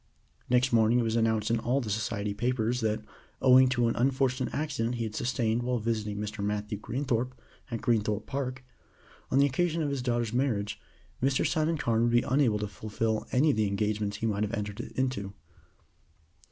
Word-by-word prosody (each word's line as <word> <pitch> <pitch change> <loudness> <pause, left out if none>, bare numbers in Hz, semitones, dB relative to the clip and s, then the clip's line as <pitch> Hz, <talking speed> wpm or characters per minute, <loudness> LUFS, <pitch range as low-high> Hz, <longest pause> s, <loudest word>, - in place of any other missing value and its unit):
Next 125 +1 +3
morning 115 +1 +4
it - - +2
was 115 0 0
announced 110 -1 +1
in 115 - +2
all 125 +4 +1
the 115 -6 -3
Society 105 -1 -2
papers 120 +2 0
that, 110 -1 0 0.4
owing 130 0 +6
to 120 -2 +2
an 115 - 0
unfortunate 130 0 +1
accident 125 -6 -1
he 120 - -2
had 110 -2 -4
sustained 115 0 0
while 125 0 0
visiting 110 -2 -2
Mr. 105 0 -4
Matthew 105 0 -2
Greenthorpe, 125 +1 -2 0.3
at 115 -3 -4
Greenthorpe 110 -3 +1
Park, 130 -1 -4 0.7
on 130 - +1
the 140 - +6
occasion 165 +4 0
of 145 - -1
his 140 -2 -2
daughter's 120 -2 -1
marriage, 120 -6 -1 0.4
Mr. 135 +1 +2
Simon 160 +1 +1
Carne 115 -5 +1
would 120 0 +3
be 120 0 +4
unable 130 -5 +2
to 105 0 -3
fulfill 110 +1 -2
any 145 +4 +4
of 110 - -2
the 110 -1 +2
engagements 105 0 -1
he 115 - -3
might 105 -2 0
have 105 +2 -1
entered 105 -2 -4
into. 125 -7 -3
115 Hz, 185 wpm, -29 LUFS, 105-130 Hz, 0.7 s, owing